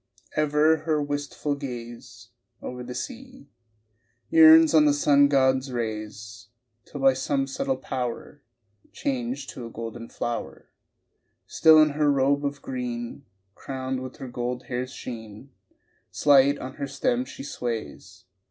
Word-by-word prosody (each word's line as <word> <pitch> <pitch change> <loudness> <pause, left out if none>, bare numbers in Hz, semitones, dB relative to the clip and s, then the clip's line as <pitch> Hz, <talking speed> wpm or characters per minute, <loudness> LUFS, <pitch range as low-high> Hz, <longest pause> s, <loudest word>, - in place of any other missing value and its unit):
Ever 155 +1 +3
her 155 -1 -1
wistful 145 0 -3
gaze 120 -3 -8 0.3
Over 125 0 -7
the 125 0 -7
sea 260 - -8 0.8
Yearns 160 0 +8
on 155 -1 +6
the 145 -1 +4
sun 145 -1 +4
god's 130 -1 +2
rays 110 -2 -5 0.4
Till 145 - -9
by 135 -1 +5
some 135 +1 -1
subtle 265 - -2
power 125 +2 -5 0.5
Changed 260 -2 -3
to 120 -2 -8
a - - -9
golden 115 0 -7
flower 120 0 -5 0.7
Still 160 -1 +6
in 155 0 +6
her 150 0 +2
robe 140 +1 +2
of 145 0 -4
green, 125 0 -5 0.3
Crowned 130 +1 -5
with 130 -1 -8
her 135 - -7
gold 125 +1 -4
hair's 125 +1 -4
sheen 110 +1 -9 0.6
Slight 140 0 +4
on 130 0 -8
her 140 -2 -3
stem 250 - 0
she 270 - -10
sways 115 - -6
135 Hz, 135 wpm, -25 LUFS, 120-150 Hz, 0.8 s, Yearns